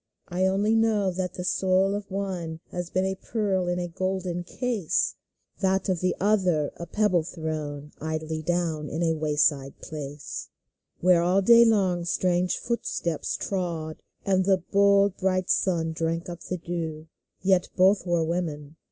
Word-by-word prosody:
I 185 +1 +1
only 205 +3 +2
know 215 -4 +2
that 180 0 -3
the 180 - -4
soul 190 +1 +2
of 205 0 -4
one 185 -5 -4
Has 175 -1 -4
been 185 +1 0
a 190 - 0
pearl 190 -2 -1
in 175 0 0
a 175 0 -2
golden 185 0 -2
case; 225 -2 -1 0.5
That 190 0 +1
of 185 -2 +1
the 185 +1 0
other 185 -7 +2
a 170 - -7
pebble 210 -5 +2
thrown 155 -3 -5
Idly 160 0 -3
down 160 -2 -1
in 165 +2 -2
a 165 -1 +2
way 155 -1 -1
side 140 -2 +1
place, 145 -2 -7 0.5
Where 180 -1 +5
all 185 +3 +2
day 235 +3 +8
long 190 -6 +2
strange 180 +1 +1
footsteps 170 -8 -2
trod, 170 -5 -3 0.2
And 190 -1 +2
the 195 -1 +4
bold, 200 -1 +4
bright 185 -1 +1
sun 165 -4 +1
drank 165 +1 -2
up 175 -1 -7
the 180 - -1
dew! 165 -2 -4 0.4
Yet 185 -1 +3
both 190 +1 +4
were 170 -1 +2
women. 160 -3 -3
180 Hz, 160 wpm, -26 LUFS, 160-190 Hz, 0.5 s, day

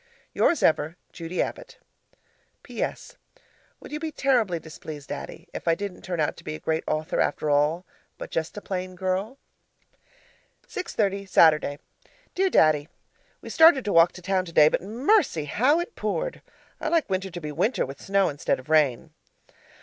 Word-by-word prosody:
Yours 340 - +2
ever, 160 +2 +2 0.2
Judy 170 +2 -2
Abbott - - -8 0.9
PS. - - -5 0.6
Would - - -12
you 300 - -4
be 320 0 -4
terribly 240 - +1
displeased, 155 -2 -10
Daddy, - - -7
if - - -7
I 165 - +4
didn't 200 0 -6
turn 175 -3 -4
out 150 - 0
to - - -13
be 155 - -5
a - - -8
Great 160 0 -1
Author 155 +1 -1
after 150 +1 0
all, 150 +5 +2 0.3
but - - -8
just 165 +4 -3
a - - -5
Plain 185 -1 -5
Girl? 190 +7 -2 1.3
6.30, 200 - -2
Saturday 155 -4 +4 0.6
Dear 380 +1 +2
Daddy, 155 - +3 0.5
We - - -8
started 320 -5 +6
to 205 - -1
walk 165 +1 +6
to 185 - -12
town 190 0 +1
today, 160 -4 +5
but - - -1
mercy! 230 - +1
how 260 - +2
it 350 +7 -5
poured. - - -3 0.4
I - - -3
like 330 0 +2
winter 190 0 -2
to 175 -1 -7
be 150 -2 -6
winter 185 - 0
with 135 +1 -10
snow 195 0 +2
instead 145 - -1
of 130 - -14
rain. 145 -6 +2
185 Hz, 165 wpm, -25 LUFS, 155-230 Hz, 1.3 s, started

